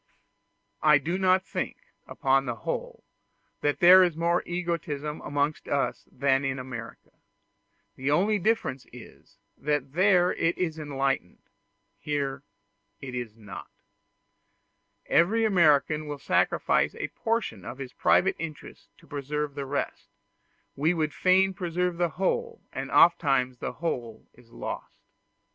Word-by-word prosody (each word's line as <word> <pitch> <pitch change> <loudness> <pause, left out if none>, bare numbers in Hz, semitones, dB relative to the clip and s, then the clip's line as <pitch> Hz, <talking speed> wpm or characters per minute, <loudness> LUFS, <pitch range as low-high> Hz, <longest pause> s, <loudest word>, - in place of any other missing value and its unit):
I 150 -1 +6
do 170 +6 -2
not 185 0 +3
think - - -4 0.3
upon 135 0 +1
the 120 - -2
whole 110 - -5 0.6
that 145 0 -1
there 180 +2 +9
is 175 -3 0
more 170 +1 +2
egotism 170 -4 -3
amongst 145 +1 -2
us 140 -1 -1
than 135 +1 +1
in 135 0 -1
America; 125 -3 -8 0.8
the 130 +2 -2
only 200 +8 +2
difference 185 - -1
is, 120 -1 -14 0.2
that 145 -2 -1
there 180 0 +4
it 165 +1 0
is 160 -3 -2
enlightened 135 -9 -2 0.6
here 140 -2 -2 0.6
it 130 -2 -8
is 120 -3 -5
not. 105 -3 -10 1.4
Every 220 +7 +3
American 155 -5 +3
will 145 -1 -4
sacrifice 140 - +1
a - - -4
portion 225 - -2
of 125 - -7
his 130 -2 -7
private 190 - +3
interests 155 -2 -8
to - - -20
preserve 145 +1 -3
the 140 -1 -5
rest; 140 +1 -3 0.7
we 160 +5 +1
would 155 -2 -1
fain 190 +1 +3
preserve 180 0 -2
the 175 -1 +1
whole, 470 - -1
and - - -4
oftentimes 135 -7 +4
the - - -4
whole 120 -9 -4
is 120 -2 -21
lost. - - -7
150 Hz, 130 wpm, -27 LUFS, 135-175 Hz, 1.4 s, there